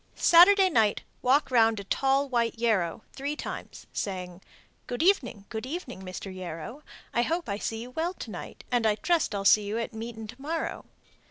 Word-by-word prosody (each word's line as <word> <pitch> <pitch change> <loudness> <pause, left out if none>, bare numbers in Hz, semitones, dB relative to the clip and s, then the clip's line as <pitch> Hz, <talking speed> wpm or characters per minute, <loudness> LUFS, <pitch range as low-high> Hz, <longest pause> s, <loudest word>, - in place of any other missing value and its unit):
Saturday 375 +3 +7
night 225 - +2 0.2
walk 270 +2 +3
round 225 -3 +4
a - - -6
tall 270 +7 +1
white 235 -3 0
yarrow 215 -5 0
three 285 +2 -3
times, - - -7
saying, 180 -2 -4 0.5
Good 245 +5 -2
evening, 260 - +2
good 220 +2 -5
evening, 265 - -6
Mr. 190 +1 -7
Yarrow. 185 - -7 0.3
I 235 - +3
hope 335 +7 -1
I 200 -1 -2
see 225 +1 -3
you 250 - -10
well 335 +6 -2
to 225 - -8
night, 175 - -8
And 245 -2 +2 0.2
trust 335 -10 +2
I'll 195 0 -3
see 210 +1 +6
you 210 +2 -2
at 230 0 -3
meetin' 225 0 -6
to 235 +5 -11
morrow. 320 +3 -3
235 Hz, 180 wpm, -28 LUFS, 205-285 Hz, 0.5 s, Saturday